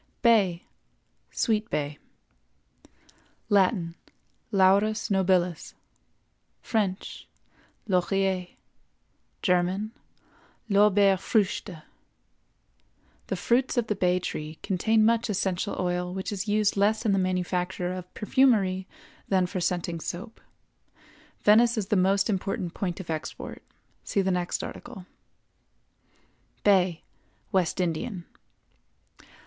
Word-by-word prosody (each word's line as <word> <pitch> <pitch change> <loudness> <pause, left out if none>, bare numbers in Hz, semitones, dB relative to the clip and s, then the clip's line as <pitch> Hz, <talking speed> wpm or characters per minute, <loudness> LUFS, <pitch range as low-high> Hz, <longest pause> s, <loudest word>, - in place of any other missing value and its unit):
BAY 200 -8 +4 0.7
(SWEET 220 0 0
BAY). 145 0 -3 1.5
Latin—Laurus 195 +2 +1
nobilis; 180 -3 +1 0.9
French—Laurier; 190 -2 -2 1.0
German—Lorbeerfrüchte. 195 0 0 1.4
The - - -2
fruits 250 +2 +1
of 240 - +2
the 220 - -1
bay 180 -1 +2
tree 155 -3 -5
contain 215 +4 +2
much 230 0 +2
essential 195 0 -1
oil 180 -1 -1
which 190 +3 -4
is 200 0 -4
used 210 0 +2
less 215 +3 +2
in 215 - +3
the 195 - +2
manufacture 180 0 -1
of 180 -1 -8
perfumery 205 -6 +2 0.4
than 185 -2 +3
for 180 +1 -4
scenting 175 -1 -1
soap. 185 +8 -7 1.0
Venice 230 +3 +5
is 205 -2 -2
the - - +2
most 195 +1 +3
important 190 -4 -2
point 180 -3 -3
of 180 -3 -5
export. 155 -1 -6 0.4
See 200 - 0
the 190 - +1
next 180 -1 -1
article. 225 -7 -8 1.6
BAY 185 -4 +3 0.5
(WEST 185 -3 +1
INDIAN). 175 +2 -2
190 Hz, 90 wpm, -27 LUFS, 180-210 Hz, 1.6 s, Venice